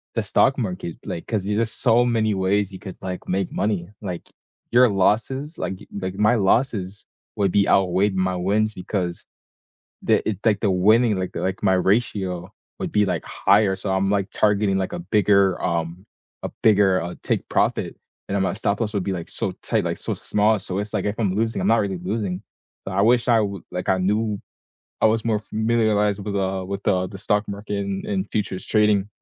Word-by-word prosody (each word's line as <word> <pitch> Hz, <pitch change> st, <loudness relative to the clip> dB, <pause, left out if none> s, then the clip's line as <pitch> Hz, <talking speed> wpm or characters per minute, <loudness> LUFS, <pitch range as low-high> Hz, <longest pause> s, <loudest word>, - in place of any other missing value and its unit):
the -, -, 0 dB
stock 135 Hz, -, +3 dB
market, 90 Hz, -7 st, -3 dB
like, 85 Hz, -, -5 dB
'cause 110 Hz, -4 st, -1 dB
there's 105 Hz, +2 st, -1 dB
just 115 Hz, -1 st, -1 dB
so 120 Hz, +2 st, +4 dB
many 110 Hz, -3 st, +1 dB
ways 100 Hz, +1 st, +1 dB
you 95 Hz, -, -9 dB
could, 95 Hz, -, -8 dB
like, 90 Hz, -1 st, -6 dB
make 95 Hz, 0 st, -1 dB
money, 100 Hz, -4 st, -1 dB
like, 90 Hz, -4 st, -5 dB, 0.5 s
your 125 Hz, +1 st, +6 dB
losses 130 Hz, -, 0 dB
like, -, -, -3 dB
y -, -, -13 dB
like, 95 Hz, -1 st, -4 dB
my 105 Hz, +4 st, +3 dB
losses 100 Hz, -2 st, 0 dB, 0.3 s
would 100 Hz, -2 st, +1 dB
be 100 Hz, 0 st, +3 dB
outweighed 95 Hz, +1 st, +2 dB
my 95 Hz, 0 st, 0 dB
wins 105 Hz, +4 st, +1 dB
because 90 Hz, -2 st, -4 dB, 0.8 s
the -, -, +1 dB
it, 105 Hz, -, -2 dB
like, 105 Hz, -3 st, +3 dB
the 105 Hz, -, +1 dB
winning, 110 Hz, +5 st, +4 dB
like, 95 Hz, -1 st, -3 dB
the -, -, -5 dB
like, 95 Hz, +2 st, -3 dB
my 95 Hz, -2 st, +4 dB
ratio 95 Hz, -2 st, 0 dB, 0.3 s
would -, -, -3 dB
be, 105 Hz, -1 st, +3 dB
like, 90 Hz, -5 st, -2 dB
higher, 100 Hz, 0 st, +3 dB
so 95 Hz, +1 st, -5 dB
I'm, 95 Hz, +1 st, +1 dB
like, 100 Hz, -1 st, 0 dB
targeting, 100 Hz, -2 st, +2 dB
like, 95 Hz, -, -2 dB
a 175 Hz, -, -4 dB
bigger 100 Hz, -, +2 dB
um, 85 Hz, +2 st, -2 dB, 0.4 s
a -, -, -2 dB
bigger, 100 Hz, -4 st, +4 dB
uh, 85 Hz, +1 st, -5 dB
take -, -, -1 dB
profit, -, -, 0 dB, 0.3 s
and 100 Hz, -, -2 dB
then 100 Hz, -, +1 dB
my 95 Hz, -, +1 dB
stop 100 Hz, 0 st, -1 dB
loss 110 Hz, -1 st, -1 dB
would 100 Hz, -3 st, -1 dB
be, 100 Hz, -, -2 dB
like, 85 Hz, -2 st, -6 dB
so -, -, -2 dB
tight, -, -, 0 dB
like, -, -, -2 dB
so -, -, -3 dB
small. 105 Hz, +1 st, +1 dB
So, 95 Hz, 0 st, -4 dB
it's 105 Hz, 0 st, -5 dB
like, -, -, -1 dB
if 105 Hz, 0 st, -1 dB
I'm 100 Hz, -5 st, +1 dB
losing, 110 Hz, +2 st, 0 dB
I'm -, -, 0 dB
not 115 Hz, -, +5 dB
really 95 Hz, -2 st, -2 dB
losing. 95 Hz, +1 st, -3 dB, 0.5 s
So, 95 Hz, -, -3 dB
I 100 Hz, -, +2 dB
wish 120 Hz, +2 st, +3 dB
I 115 Hz, -2 st, +5 dB
would 100 Hz, -3 st, -4 dB
like, 90 Hz, 0 st, -3 dB
I 95 Hz, -, +3 dB
knew 105 Hz, +2 st, 0 dB, 0.6 s
I -, -, +5 dB
was 110 Hz, 0 st, +2 dB
more 110 Hz, -2 st, +1 dB
familiarized 110 Hz, -2 st, +1 dB
with 105 Hz, -, -4 dB
the 95 Hz, -1 st, -1 dB
with 100 Hz, +1 st, -5 dB
the 95 Hz, -3 st, +1 dB
the 95 Hz, -, -9 dB
stock 105 Hz, +1 st, 0 dB
market 100 Hz, 0 st, -4 dB
and 95 Hz, -1 st, -4 dB
and 100 Hz, 0 st, -2 dB
futures 100 Hz, -3 st, -2 dB
trading. 105 Hz, -2 st, +2 dB
100 Hz, 210 wpm, -23 LUFS, 95-110 Hz, 0.8 s, your